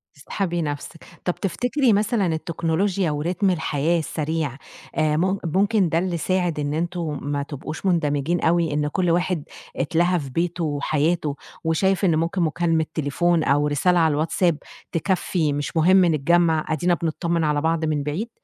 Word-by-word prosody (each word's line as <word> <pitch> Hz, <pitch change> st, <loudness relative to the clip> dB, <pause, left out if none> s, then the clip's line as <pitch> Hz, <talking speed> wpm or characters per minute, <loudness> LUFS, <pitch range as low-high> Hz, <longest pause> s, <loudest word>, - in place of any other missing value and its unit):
تسحبي 175 Hz, +4 st, -3 dB
نفسِك، 145 Hz, +1 st, -5 dB, 0.2 s
طب 180 Hz, -, 0 dB
تفتكرِي 245 Hz, +5 st, +1 dB
مثلًا 210 Hz, 0 st, +1 dB
التكنولوجيا 170 Hz, +2 st, 0 dB
وريتم 175 Hz, +6 st, 0 dB
الحياة 165 Hz, -1 st, 0 dB
السريع، 155 Hz, -3 st, -3 dB, 0.4 s
آآ 155 Hz, -1 st, +2 dB
مم 190 Hz, +4 st, +1 dB
ممكن 195 Hz, +3 st, +2 dB
ده 160 Hz, -, +1 dB
اللي 180 Hz, -1 st, -1 dB
ساعد 175 Hz, -1 st, 0 dB
إن 145 Hz, 0 st, -2 dB
أنتم 165 Hz, -2 st, -2 dB
ما 145 Hz, 0 st, -2 dB
تبقوش 155 Hz, +5 st, -7 dB
مندمجين 160 Hz, -1 st, +1 dB
أوي، 165 Hz, -2 st, +2 dB
إن 150 Hz, 0 st, 0 dB
كل 175 Hz, +2 st, 0 dB
واحد 175 Hz, -2 st, 0 dB, 0.3 s
اتلَهَى 170 Hz, +5 st, +1 dB
في 140 Hz, -3 st, -6 dB
بيتُه 170 Hz, +5 st, -1 dB
وحياته، 150 Hz, 0 st, 0 dB, 0.3 s
وشايف 190 Hz, +4 st, +1 dB
إن 170 Hz, -4 st, +3 dB
ممكن 165 Hz, +3 st, 0 dB
مكالمة 165 Hz, 0 st, +1 dB
تليفون 160 Hz, +3 st, +1 dB
أو 145 Hz, +1 st, +2 dB
رسالة 175 Hz, +5 st, +2 dB
على 160 Hz, -2 st, +3 dB
الواتساب 160 Hz, +2 st, +1 dB, 0.3 s
تكفّي، 170 Hz, -3 st, 0 dB
مش 145 Hz, +3 st, -3 dB
مهم 185 Hz, +3 st, +5 dB
نتجمع، 160 Hz, 0 st, +2 dB
أدينا 165 Hz, +3 st, +1 dB
بنتطّمن 170 Hz, 0 st, -1 dB
على 150 Hz, -1 st, +1 dB
بعض 165 Hz, 0 st, 0 dB
من 150 Hz, -2 st, -1 dB
بعيد؟ 160 Hz, +11 st, -3 dB
165 Hz, 155 wpm, -23 LUFS, 150-180 Hz, 0.4 s, مهم